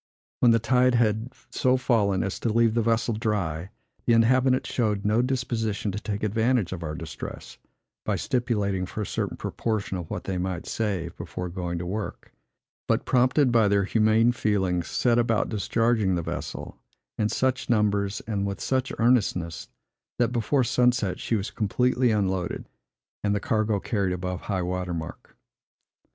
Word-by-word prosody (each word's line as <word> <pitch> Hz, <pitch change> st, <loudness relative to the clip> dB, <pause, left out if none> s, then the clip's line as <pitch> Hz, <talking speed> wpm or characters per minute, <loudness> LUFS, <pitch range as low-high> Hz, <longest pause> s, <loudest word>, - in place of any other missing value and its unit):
When 120 Hz, -, +5 dB
the 115 Hz, -, +6 dB
tide 125 Hz, +2 st, +3 dB
had 110 Hz, +1 st, +1 dB, 0.2 s
so 130 Hz, 0 st, +2 dB
fallen 105 Hz, -7 st, +2 dB
as 95 Hz, -, -3 dB
to 115 Hz, -, -1 dB
leave 115 Hz, 0 st, +3 dB
the 115 Hz, -, +2 dB
vessel 115 Hz, +1 st, +1 dB
dry, 100 Hz, -6 st, -2 dB, 0.4 s
the 120 Hz, -, +5 dB
inhabitants 130 Hz, +3 st, +3 dB
showed 105 Hz, -4 st, 0 dB
no 105 Hz, +3 st, +3 dB
disposition 115 Hz, -5 st, -1 dB
to 100 Hz, -, -4 dB
take 105 Hz, -1 st, -4 dB
advantage 110 Hz, -2 st, +1 dB
of 90 Hz, -, -6 dB
our 75 Hz, -2 st, -4 dB
distress, 80 Hz, -6 st, -8 dB, 0.4 s
by -, -, 0 dB
stipulating 105 Hz, -7 st, -1 dB
for 105 Hz, -, -4 dB
a -, -, -3 dB
certain -, -, -3 dB
proportion 110 Hz, -4 st, -2 dB
of 85 Hz, -, -7 dB
what -, -, -4 dB
they 95 Hz, -2 st, -2 dB
might 90 Hz, -1 st, -3 dB
save, 95 Hz, -6 st, -2 dB
before 90 Hz, 0 st, -5 dB
going 85 Hz, -1 st, -3 dB
to 85 Hz, -, -4 dB
work; 105 Hz, +4 st, -5 dB, 0.5 s
but, -, -, +1 dB
prompted 130 Hz, +2 st, +3 dB
by 115 Hz, -3 st, +4 dB
their 100 Hz, 0 st, +3 dB
humane 110 Hz, +3 st, +3 dB
feelings, 95 Hz, -7 st, 0 dB
set 120 Hz, -1 st, +2 dB
about 115 Hz, -2 st, +1 dB
discharging 110 Hz, -1 st, +1 dB
the 85 Hz, -, -2 dB
vessel, -, -, -6 dB, 0.4 s
in 105 Hz, -1 st, +2 dB
such 130 Hz, +2 st, 0 dB
numbers 105 Hz, -3 st, +1 dB
and 100 Hz, -3 st, -1 dB
with 100 Hz, -1 st, -4 dB
such 130 Hz, 0 st, 0 dB
earnestness, 105 Hz, -8 st, +1 dB, 0.5 s
that 120 Hz, -2 st, +2 dB
before 125 Hz, +3 st, +1 dB
sunset 120 Hz, -6 st, +1 dB
she 115 Hz, -, -1 dB
was 100 Hz, -2 st, -2 dB
completely 125 Hz, +4 st, +1 dB
unloaded, 95 Hz, -4 st, -1 dB, 0.6 s
and 105 Hz, 0 st, +1 dB
the -, -, +1 dB
cargo 110 Hz, 0 st, 0 dB
carried 100 Hz, -3 st, -1 dB
above 90 Hz, 0 st, -4 dB
high 95 Hz, -3 st, -2 dB
water 90 Hz, 0 st, -2 dB
mark. 80 Hz, -1 st, -8 dB
105 Hz, 165 wpm, -26 LUFS, 95-120 Hz, 0.6 s, the